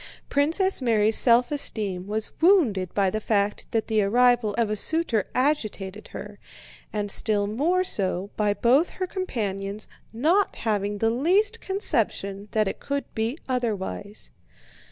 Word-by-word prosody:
Princess 325 +6 +2
Mary's 220 -3 +2
self 240 +1 +4
esteem 200 -10 -1
was 215 +1 -2
wounded 260 - +3
by 195 -2 +2
the 215 - -3
fact 205 -1 -1
that 225 -2 0
the 220 -2 +1
arrival 240 0 +3
of 225 -3 +1
a - - 0
suitor 245 - 0
agitated 215 -8 -1
her, 205 0 -9 0.5
and 205 -1 -2
still 205 -1 0
more 305 - +1
so 195 - -2
by 210 -1 +1
both 255 +10 +3
her 370 - -4
companions' 210 - -3 0.2
not 325 - +1
having 205 -2 -1
the 225 +2 +1
least 390 - +1
conception 215 - 0
that 215 -1 +1
it - - -4
could 280 0 -3
be 225 +5 -2
otherwise. 205 - -4
220 Hz, 140 wpm, -25 LUFS, 205-280 Hz, 0.5 s, self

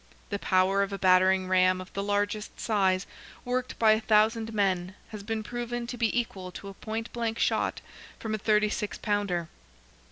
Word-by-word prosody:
The 200 - -1
power 190 +1 +2
of 200 0 -1
a 200 - -3
battering 185 0 +4
ram 185 0 +3
of 185 0 -10
the 200 - -2
largest 205 +1 -2
size, 190 -4 +1 0.4
worked 250 0 -2
by 220 -1 +5
a 220 +1 +3
thousand 220 +1 +2
men, 190 -3 0
has 215 -2 -7
been 220 +1 -3
proven 240 +1 -4
to 245 - -5
be 235 0 +1
equal 190 -6 -5
to 200 - -8
a - - -9
point 225 +3 -5
blank 230 -1 -2
shot - - 0 0.4
from 220 -1 -4
a 215 - -1
thirty 210 0 +3
six 210 0 -3
pounder. 200 -5 -1
205 Hz, 185 wpm, -28 LUFS, 190-225 Hz, 0.4 s, by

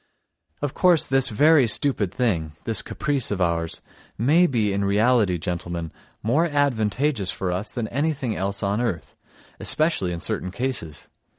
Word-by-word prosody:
Of 145 - -1
course, 180 -4 +4
this 135 0 +3
very 145 +4 +4
stupid 110 -4 +1
thing, 90 -11 -1
this 115 - +1
caprice 145 -4 -2
of 100 - -2
ours, 85 -2 0 0.4
may 155 +10 +4
be 110 - 0
in 100 0 0
reality, 105 -1 +2
gentlemen, 85 -1 -4 0.3
more 135 +10 +2
advantageous 130 - 0
for 95 -1 -2
us 95 +5 -2
than 120 -4 -3
anything 140 -4 -1
else 100 +1 -2
on 100 +3 0
earth, 100 -9 -3 0.4
especially 155 - 0
in 85 - -4
certain 90 - -3
cases. 95 - -4
110 Hz, 150 wpm, -23 LUFS, 95-140 Hz, 0.4 s, course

